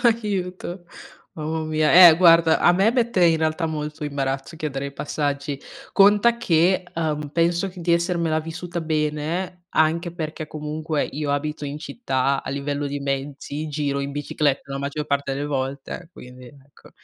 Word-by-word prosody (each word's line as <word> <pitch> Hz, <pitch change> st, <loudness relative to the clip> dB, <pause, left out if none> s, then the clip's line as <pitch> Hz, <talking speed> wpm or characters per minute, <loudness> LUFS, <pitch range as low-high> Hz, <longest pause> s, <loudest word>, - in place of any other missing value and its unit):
Aiuto. 190 Hz, -6 st, -1 dB, 0.5 s
Mamma 160 Hz, +1 st, -3 dB
mia, 155 Hz, -1 st, +1 dB, 0.2 s
eh 160 Hz, -, +6 dB
guarda 165 Hz, -2 st, +6 dB
a 175 Hz, -, +5 dB
me 195 Hz, +5 st, +3 dB
mette 235 Hz, -7 st, +2 dB
in 165 Hz, -1 st, +5 dB
realtà 160 Hz, +1 st, 0 dB
molto 150 Hz, 0 st, -5 dB
imbarazzo 140 Hz, +1 st, -3 dB
chiedere 140 Hz, -3 st, -3 dB
i 140 Hz, -, -7 dB
passaggi, 140 Hz, -1 st, -3 dB, 0.3 s
conta 205 Hz, +4 st, +5 dB
che, 185 Hz, -3 st, +2 dB
uhm, 150 Hz, -2 st, -2 dB
penso 170 Hz, +4 st, +1 dB
di 175 Hz, -1 st, -1 dB
essermela 170 Hz, -2 st, +1 dB
vissuta 170 Hz, +2 st, -5 dB
bene, 160 Hz, +3 st, -2 dB
anche 165 Hz, +2 st, +1 dB
perché 155 Hz, -2 st, -5 dB
comunque 155 Hz, 0 st, -3 dB
io 145 Hz, 0 st, -4 dB
abito 150 Hz, +1 st, -2 dB
in 145 Hz, +1 st, -5 dB
città 140 Hz, -, -1 dB
a -, -, -5 dB
livello 145 Hz, +1 st, -2 dB
di 145 Hz, +1 st, -3 dB
mezzi, 140 Hz, +2 st, -4 dB
giro 145 Hz, -2 st, -1 dB
in 140 Hz, 0 st, -3 dB
bicicletta 145 Hz, -1 st, -1 dB
la 135 Hz, -, -3 dB
maggior 145 Hz, +2 st, -4 dB
parte 140 Hz, -1 st, -1 dB
delle 140 Hz, +2 st, -3 dB
volte, 140 Hz, +4 st, -4 dB
quindi 125 Hz, -3 st, -12 dB
ecco 140 Hz, +1 st, -18 dB
155 Hz, 155 wpm, -23 LUFS, 140-170 Hz, 0.5 s, eh